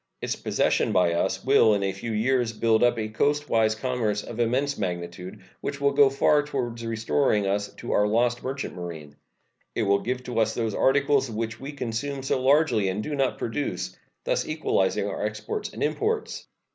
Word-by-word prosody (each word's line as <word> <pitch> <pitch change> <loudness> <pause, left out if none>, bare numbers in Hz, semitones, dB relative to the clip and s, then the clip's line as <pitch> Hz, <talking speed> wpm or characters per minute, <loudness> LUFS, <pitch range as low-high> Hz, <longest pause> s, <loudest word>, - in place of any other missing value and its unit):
Its - - -2
possession - - +1
by 90 -2 +3
us 85 - -1
will 110 -2 +5
in 100 - -1
a 95 - 0
few 100 +5 -6
years 120 +1 +1
build 110 0 +2
up 120 -1 +3
a 110 -1 -2
coastwise 115 -2 +1
commerce 110 -4 -1
of 120 - -8
immense 130 +5 +1
magnitude, 90 0 -5 0.2
which 140 0 -4
will 140 0 +3
go 140 -1 +5
far 140 +2 +3
toward 125 -5 -4
restoring 115 0 +1
to 95 - 0
us 100 0 -2 0.2
our 105 - +2
lost 120 +3 +1
merchant 135 +1 -4
marine. 80 -5 -8 0.6
It 115 - +1
will 100 -1 +3
give 125 +4 -3
to 125 -2 -2
us 110 0 +1
those 115 -3 -1
articles 140 +1 +2
which 115 0 -4
we 135 +2 -6
consume 135 +1 -4
so 130 -1 0
largely 130 -7 +3
and 100 +3 -2
do 150 - -4
not 135 -2 0
produce, 130 +6 -3 0.3
thus - - 0
equalizing - - 0
our - - -4
exports 440 -1 -4
and - - -4
imports. 440 +1 -1
115 Hz, 185 wpm, -26 LUFS, 105-135 Hz, 0.6 s, will